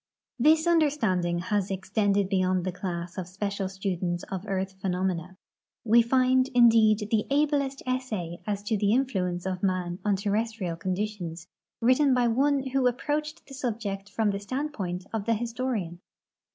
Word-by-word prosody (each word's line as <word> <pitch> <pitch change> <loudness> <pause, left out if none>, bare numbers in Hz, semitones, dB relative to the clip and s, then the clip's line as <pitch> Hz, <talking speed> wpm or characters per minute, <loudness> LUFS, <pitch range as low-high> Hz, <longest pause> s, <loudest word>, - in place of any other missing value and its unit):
This 310 +5 +5
understanding 270 - +2
has 190 +2 -1
extended 200 +1 +1
beyond 185 -2 +1
the 185 - -1
class 175 0 -5
of 180 - -5
special 200 +1 -3
students 180 -2 -2
of 190 +2 -4
earth 190 -1 -2
phenomena. 185 -1 -2 0.5
M"e 230 +2 +6
find, 255 +2 +3
indeed, 225 -3 +5
the 215 -2 +1
ablest 280 -1 +1
essay 220 -10 -3
as 205 -1 -2
to 215 +1 0
the 205 +1 +2
influence 190 -9 0
of 185 -1 -3
man 185 -2 -1
on 205 -2 +2
ter 200 +1 -2
restrial 210 -6 -2
conditions 185 -3 -3 0.4
written 255 +3 +4
by 245 -1 +3
one 275 +3 +2
who 265 -1 +2
approached 300 +5 -2
the 275 - -13
subject 215 -6 -4
from 210 0 +1
the 200 - -3
standpoint 200 -7 -4
of 215 -3 -2
the 230 0 +2
historian. 230 -6 -3
205 Hz, 150 wpm, -27 LUFS, 185-250 Hz, 0.5 s, M"e